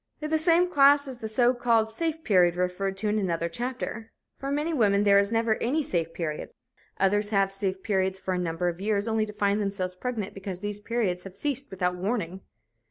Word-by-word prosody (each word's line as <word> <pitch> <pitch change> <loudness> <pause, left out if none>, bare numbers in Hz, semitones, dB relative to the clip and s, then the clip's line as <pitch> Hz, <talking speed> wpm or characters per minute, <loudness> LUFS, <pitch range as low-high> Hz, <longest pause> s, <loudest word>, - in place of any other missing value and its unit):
In 305 0 -5
the 315 - +4
same 340 +2 +4
class 285 -3 +5
is 260 -2 -6
the 220 - -4
so 240 +3 +3
called 230 -3 +2
"safe 320 +5 -2
period" 180 - +4
referred 180 +2 -1
to 210 +2 -2
in 210 +1 +1
another 170 -4 -1
chapter. 235 +3 -5 0.3
For 275 - -4
many 300 +4 -1
women 205 -7 +3
there 200 -1 +6
is 200 +1 0
never 225 -1 +1
any 295 +6 +1
"safe 165 - -1
period." 155 -3 -4 0.5
Others 205 +2 +2
have 195 -2 +2
"safe 195 -1 -2
periods" 190 -2 0
for 190 0 -2
a 180 - -1
number 175 0 -1
of 175 +1 -3
years, 205 +1 0
only 220 -1 +1
to 210 - -8
find 205 0 +1
themselves 195 -2 -2
pregnant 210 0 -4
because 190 -2 -6
these 205 0 -4
periods 210 -5 -1
have 195 0 -11
ceased 280 +1 -2
without 180 -1 -1
warning. 190 -2 -2
205 Hz, 210 wpm, -27 LUFS, 190-240 Hz, 0.5 s, there